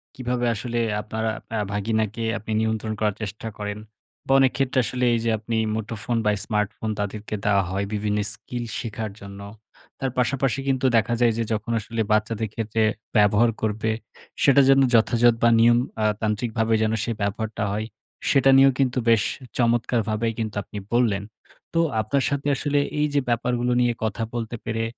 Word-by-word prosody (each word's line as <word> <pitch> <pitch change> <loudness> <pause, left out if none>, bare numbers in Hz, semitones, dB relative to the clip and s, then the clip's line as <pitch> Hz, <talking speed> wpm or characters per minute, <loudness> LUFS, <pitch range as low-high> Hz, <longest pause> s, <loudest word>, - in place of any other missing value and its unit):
কীভাবে 125 -1 -2
আসলে 120 +2 -3 0.2
আপনারা 110 +1 -2 0.3
আ - - 0
ভাগিনাকে 110 +2 -1
আপনি 110 - -7
নিয়ন্ত্রণ 110 0 -1
করার 105 -2 +1
চেষ্টা 105 +2 -5
করেন? 105 0 -4 0.5
বা - - 0
অনেক 135 -1 +4
ক্ষেত্রে 135 -1 +1
আসলে 125 0 -1
এই 115 - +1
যে - - +2
আপনি 115 +1 -3 0.2
মুঠোফোন 110 +1 -3
বা 105 - +4
স্মার্টফোন 105 0 -2
তাদেরকে 105 +1 -4
দেওয়া 100 -1 +3
হয় 100 +2 -1
বিভিন্ন 105 0 0
স্কিল 120 +3 -6 0.2
শেখার 110 -3 -4
জন্য। 100 0 -9 0.6
তার 135 -2 -1
পাশাপাশি 135 +1 +1
কিন্তু 130 -1 +1
দেখা 115 +2 +1
যায় 120 -2 +4
যে 115 - 0
যখন 105 +1 -3
আসলে 115 +1 -3
বাচ্চাদের 110 0 +1
ক্ষেত্রে 110 0 -1 0.3
ব্যবহার 105 +3 +4
করবে, 110 0 0 0.5
সেটা 140 0 +6
যেন 135 0 +6 0.2
যথাযথ 115 +1 +4
বা 120 - +6
নিয়ম 120 +1 +6 0.3
আ - - +3 0.2
তান্ত্রিকভাবে 110 +1 0
যেন 110 0 +1
সে 120 - -2
ব্যবহারটা 105 +2 -2
হয়, 110 +1 -2 0.4
সেটা 135 -1 +4
নিয়েও 135 -1 +6
কিন্তু 130 -2 +1
বেশ 115 -1 +5 0.3
চমৎকারভাবেই 115 -2 +1
কিন্তু 110 -2 -3
আপনি 105 - -10 0.2
বললেন। 110 -5 +2 0.5
তো 165 - +2 0.2
আপনার 130 +6 0
সাথে 140 0 -2
আসলে 145 +1 0 0.2
এই 150 - +3
যে 145 - +3
ব্যাপারগুলো 120 +1 0
নিয়ে 120 -1 +2
কথা 110 +1 -1
বলতে 115 0 -3
পেরে 115 0 -1
115 Hz, 165 wpm, -24 LUFS, 105-120 Hz, 0.6 s, সেটা